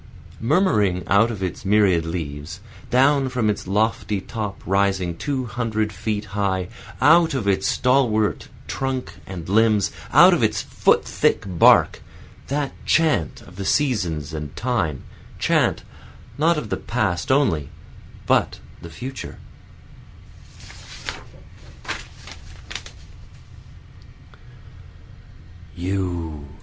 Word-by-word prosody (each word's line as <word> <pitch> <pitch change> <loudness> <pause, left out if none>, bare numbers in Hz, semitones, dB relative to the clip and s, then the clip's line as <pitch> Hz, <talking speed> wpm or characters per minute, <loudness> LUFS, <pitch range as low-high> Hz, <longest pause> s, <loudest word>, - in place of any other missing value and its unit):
Murmuring 110 - +2
out 100 +3 +4
of 105 -5 -5
its 90 +2 -4
myriad 95 -5 +3
leaves, 80 0 -5 0.3
Down 135 +2 +3
from 120 -4 +1
its 100 - -6
lofty 105 0 0
top 105 0 -5
rising 95 -2 +1
two 130 - -2
hundred 110 -1 -2
feet 105 -1 -3
high, 95 -3 -1 0.3
Out 160 +3 +5
of 115 -6 -2
its 95 -1 +2
stalwart 120 -5 +1 0.2
trunk 135 -1 -3
and 90 -4 -7
limbs, 105 0 +3 0.2
out - - +8
of - - +1
its - - +1
foot - - +2
thick - - +1
bark, 90 -4 +4 0.5
That 140 0 -1
chant 155 - +1
of 90 - -15
the 100 - -4
seasons 90 - 0
and 75 -3 -6
time, 105 - -1 0.3
chant - - +1 0.5
not 160 +3 +2
of 115 -8 -4
the - - 0
past 105 -7 -1
only 85 - +2 0.6
but - - +1 0.2
the 85 - -9
future. 130 +11 -7
105 Hz, 100 wpm, -22 LUFS, 90-125 Hz, 0.6 s, out